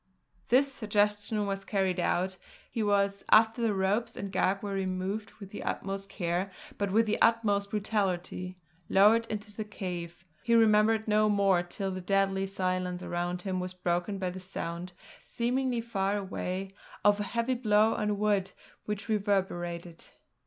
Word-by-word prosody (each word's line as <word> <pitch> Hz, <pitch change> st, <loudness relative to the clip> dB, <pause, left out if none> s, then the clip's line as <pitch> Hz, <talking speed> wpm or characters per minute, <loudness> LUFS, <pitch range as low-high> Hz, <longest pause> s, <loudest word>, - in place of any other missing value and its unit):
This 275 Hz, +3 st, +4 dB
suggestion 210 Hz, -1 st, 0 dB
was 195 Hz, 0 st, -3 dB
carried 190 Hz, -3 st, 0 dB
out; 185 Hz, +2 st, 0 dB, 0.3 s
he 230 Hz, -, -2 dB
was, 200 Hz, -1 st, +1 dB
after 225 Hz, +2 st, +5 dB
the 230 Hz, -2 st, +2 dB
ropes 195 Hz, +4 st, 0 dB
and 200 Hz, -1 st, -5 dB
gag 190 Hz, +1 st, +1 dB
were 200 Hz, -1 st, -3 dB
removed 190 Hz, +2 st, -2 dB
with 200 Hz, -3 st, -11 dB
the 210 Hz, -, -6 dB
utmost 195 Hz, 0 st, -3 dB
care 185 Hz, 0 st, -2 dB, 0.3 s
but 200 Hz, -1 st, 0 dB
with 225 Hz, +3 st, +4 dB
the 215 Hz, -, -1 dB
utmost 205 Hz, -3 st, +3 dB
brutality, 190 Hz, -3 st, -2 dB, 0.3 s
lowered 220 Hz, +4 st, +5 dB
into 210 Hz, -1 st, -6 dB
the 215 Hz, -, -3 dB
cave. 180 Hz, -4 st, -6 dB, 0.2 s
He 235 Hz, -, +2 dB
remembered 220 Hz, 0 st, +4 dB
no 215 Hz, 0 st, +3 dB
more 200 Hz, -3 st, +3 dB
till 190 Hz, +2 st, -4 dB
the 185 Hz, 0 st, -5 dB
deadly 195 Hz, 0 st, +1 dB
silence 185 Hz, -1 st, -1 dB
around 175 Hz, +1 st, -3 dB
him 185 Hz, -2 st, -2 dB
was 180 Hz, 0 st, -5 dB
broken 180 Hz, +2 st, -1 dB
by 185 Hz, -2 st, -2 dB
the 185 Hz, -, -7 dB
sound, 180 Hz, -1 st, -5 dB, 0.3 s
seemingly 245 Hz, 0 st, -1 dB
far 200 Hz, -3 st, -1 dB
away, 190 Hz, -1 st, -4 dB, 0.3 s
of 205 Hz, 0 st, +5 dB
a -, -, 0 dB
heavy 235 Hz, +5 st, -1 dB
blow 220 Hz, -2 st, +3 dB
on 210 Hz, -1 st, -1 dB
wood 200 Hz, -2 st, +1 dB, 0.3 s
which 210 Hz, -1 st, -4 dB
reverberated. 180 Hz, -5 st, -1 dB
200 Hz, 155 wpm, -30 LUFS, 185-215 Hz, 0.3 s, after